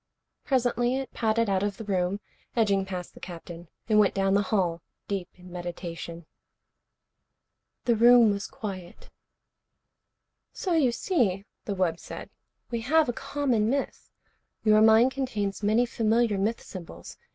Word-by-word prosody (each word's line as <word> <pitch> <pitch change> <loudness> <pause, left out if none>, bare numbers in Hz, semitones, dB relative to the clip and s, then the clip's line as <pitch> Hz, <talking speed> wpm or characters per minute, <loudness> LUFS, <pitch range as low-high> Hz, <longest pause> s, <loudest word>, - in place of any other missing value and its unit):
Presently 245 -2 +1
it 270 -1 -4
padded 230 0 +1
out 195 -1 +1
of 205 -1 -2
the - - -6
room, 195 0 -1 0.3
edging 200 -4 +2
past 180 -2 -6
the - - -14
Captain. 170 -1 -9 0.2
It 220 - 0
went 210 -2 +4
down 195 0 +2
the 200 - +4
hall, 185 -5 0 0.3
deep 195 -3 -3
in 180 0 -14
meditation. 170 -1 -6 1.6
The 235 - +3
room 235 -1 +7
was 200 0 -3
quiet. 185 -5 -8 1.4
"So 365 - -2
you 290 -7 +3
see," 225 - 0 0.2
the 200 - -2
wub 175 -3 0
said, - - -9 0.4
"we 235 -1 -2
have 305 +4 +3
a - - 0
common 245 -5 0
myth. 275 +2 -2 0.5
Your 215 -1 +5
mind 220 +3 +6
contains 215 -8 -3
many 215 +4 +3
familiar 225 -2 +1
myth 220 +4 -1
symbols. 165 - -10
210 Hz, 140 wpm, -27 LUFS, 185-235 Hz, 1.6 s, room